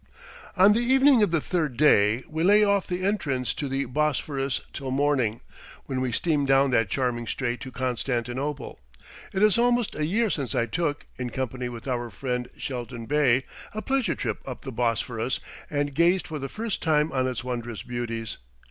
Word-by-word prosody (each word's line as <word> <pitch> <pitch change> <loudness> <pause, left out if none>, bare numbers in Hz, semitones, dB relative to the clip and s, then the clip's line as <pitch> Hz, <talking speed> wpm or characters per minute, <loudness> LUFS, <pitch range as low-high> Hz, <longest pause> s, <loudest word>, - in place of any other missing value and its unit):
On 195 +3 +7
the 225 - +2
evening 265 +1 +5
of 205 - +4
the 165 -1 +2
third 155 -6 -1
day 115 -4 +4
we 160 +1 -2
lay 205 +3 +6
off 200 -2 +2
the 180 +1 -2
entrance 140 - 0
to 145 - -3
the 135 +1 -1
Bosphorus 140 0 -1
till 135 -1 -5
morning, 130 -5 +1 0.4
when 130 -1 -2
we 130 -1 0
steam 145 +2 +1
down 135 0 +4
that 115 -5 +2
charming 120 -2 -1
strait 120 0 -2
to 130 - -7
Constantinople. 130 - -2 0.5
It 195 +1 +1
is 215 0 +5
almost 240 -1 +2
a 150 0 -1
year 220 +4 +1
since 140 -5 -2
I 115 - +2
took, 145 +4 -2
in 125 -1 -2
company 125 0 -3
with 120 +1 -8
our 120 -2 -2
friend 125 +4 -3
Shelton 120 -3 -5
Bey, 135 -2 +3 0.3
a 215 0 -4
pleasure 265 -9 +1
trip 110 -4 -3
up 130 -2 -7
the 135 - -5
Bosphorus 115 +1 -1 0.3
and 145 -1 -1
gazed 175 +4 +3
for 155 -2 -5
the 135 0 -4
first 220 -2 -3
time 155 -1 +2
on 130 -1 +1
its 125 -3 -3
wondrous 120 -3 -4
beauties. 115 -2 -4
135 Hz, 185 wpm, -26 LUFS, 125-165 Hz, 0.5 s, On